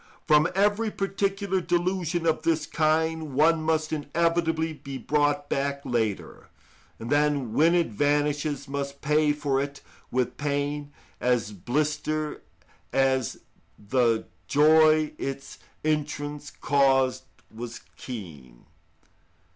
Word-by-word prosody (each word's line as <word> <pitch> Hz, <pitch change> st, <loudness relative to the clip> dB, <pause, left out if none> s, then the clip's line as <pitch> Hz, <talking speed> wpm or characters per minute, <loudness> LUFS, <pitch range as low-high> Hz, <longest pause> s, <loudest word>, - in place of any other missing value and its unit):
From 150 Hz, 0 st, +5 dB
every 205 Hz, +3 st, +2 dB
particular 195 Hz, -1 st, -1 dB
delusion 175 Hz, -1 st, 0 dB
of 160 Hz, -1 st, +1 dB
this 160 Hz, -1 st, +1 dB
kind 160 Hz, -2 st, 0 dB
one 160 Hz, +3 st, +4 dB
must 155 Hz, 0 st, 0 dB
inevitably 160 Hz, +1 st, 0 dB
be 140 Hz, -2 st, -8 dB
brought 145 Hz, 0 st, +1 dB
back 140 Hz, 0 st, -1 dB
later, 115 Hz, -6 st, -2 dB, 0.5 s
and 115 Hz, +2 st, -7 dB
then 145 Hz, -5 st, +1 dB
when 165 Hz, +6 st, +4 dB
it 170 Hz, -2 st, +2 dB
vanishes 145 Hz, +3 st, 0 dB
must 140 Hz, 0 st, -4 dB
pay 150 Hz, 0 st, +3 dB
for 145 Hz, -2 st, 0 dB
it 140 Hz, 0 st, -5 dB, 0.3 s
with 125 Hz, -1 st, -1 dB
pain 145 Hz, 0 st, -2 dB, 0.3 s
as 120 Hz, -3 st, +1 dB
bitter 150 Hz, -, -2 dB, 0.5 s
as 130 Hz, -2 st, +1 dB, 0.4 s
the 115 Hz, +1 st, +1 dB, 0.2 s
joy 155 Hz, +1 st, +5 dB
its 135 Hz, 0 st, -5 dB, 0.3 s
entrance 150 Hz, -1 st, -2 dB
caused 135 Hz, -2 st, +2 dB, 0.3 s
was 115 Hz, +1 st, -7 dB
keen. 75 Hz, -, -9 dB
145 Hz, 105 wpm, -26 LUFS, 135-160 Hz, 0.5 s, From